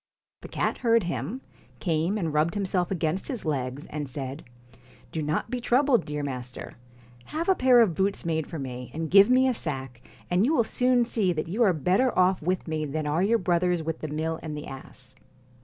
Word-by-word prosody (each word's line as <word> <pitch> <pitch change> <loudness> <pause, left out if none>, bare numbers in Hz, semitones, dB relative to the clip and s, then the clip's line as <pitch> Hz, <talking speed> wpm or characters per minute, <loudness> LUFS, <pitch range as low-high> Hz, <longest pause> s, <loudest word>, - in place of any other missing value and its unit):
The - - -8
cat - - -2
heard 230 -3 +3
him, 195 +8 -4 0.4
came 165 +5 0
and 165 -7 -2
rubbed 155 +4 +1
himself 185 -3 0
against 170 0 -1
his 250 - -4
legs, 135 -2 -2
and 150 -2 -5
said: 135 +2 -5 0.7
'Do 160 - -3
not 150 - -2
be 250 -1 -2
troubled, 245 -3 +3
dear 150 0 -4
master. 125 -3 -5 0.5
Have 325 +2 -4
a 380 - +6
pair 255 -6 +5
of 210 -7 +3
boots 195 +3 -1
made 160 -2 -1
for 165 - -6
me, 125 -3 -6
and 160 -1 -3
give 195 +3 +7
me 255 +1 +5
a 255 - +2
sack, 135 - -4 0.3
and 180 +2 +2
you 295 +7 +2
will 235 - +4
soon 250 +1 +2
see 210 -6 +1
that 155 0 -3
you 200 +8 -2
are 210 -5 +6
better 185 - +1
off 185 0 +3
with 180 +3 -1
me 155 -1 -2
than 155 +1 -3
are 150 +4 0
your 220 +5 +3
brothers 175 -2 +1
with 160 0 -3
the 155 - -4
mill 160 +2 -2
and 155 -2 -5
the 150 - -6
ass.' 130 -1 -9
170 Hz, 205 wpm, -26 LUFS, 150-215 Hz, 0.7 s, give